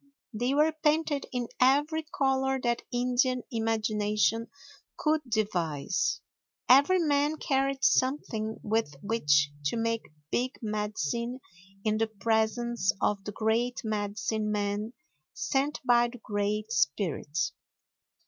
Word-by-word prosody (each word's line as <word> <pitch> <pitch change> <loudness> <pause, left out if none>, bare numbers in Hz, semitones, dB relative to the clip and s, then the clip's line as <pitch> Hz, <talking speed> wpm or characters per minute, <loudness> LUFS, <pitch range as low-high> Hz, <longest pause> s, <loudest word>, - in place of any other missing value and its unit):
They 245 +5 0
were 310 +2 +4
painted 300 -2 +1
in 245 -2 -2
every 290 +5 +3
color 265 -3 0
that 235 -1 +1
Indian 250 +1 +1
imagination 220 0 0 0.5
could 310 0 +1
devise. 185 -7 0 0.5
Every 285 +9 +6
man 295 -2 +2
carried 275 -1 0
something 235 -6 +1
with 220 -9 0
which 150 -9 +2
to 150 - 0
make 230 0 -1 0.2
big 255 +1 -1
medicine 215 - -2 0.4
in 215 0 +1
the 225 - +2
presence 220 +1 0
of 200 -2 0
the 210 - -4
great 230 +4 0
medicine 215 0 -2
man 205 +2 -2 0.4
sent 280 +2 0
by 240 -1 +5
the 240 +1 -10
great 210 0 -2
spirit. 155 -1 0
230 Hz, 110 wpm, -29 LUFS, 210-265 Hz, 0.5 s, Every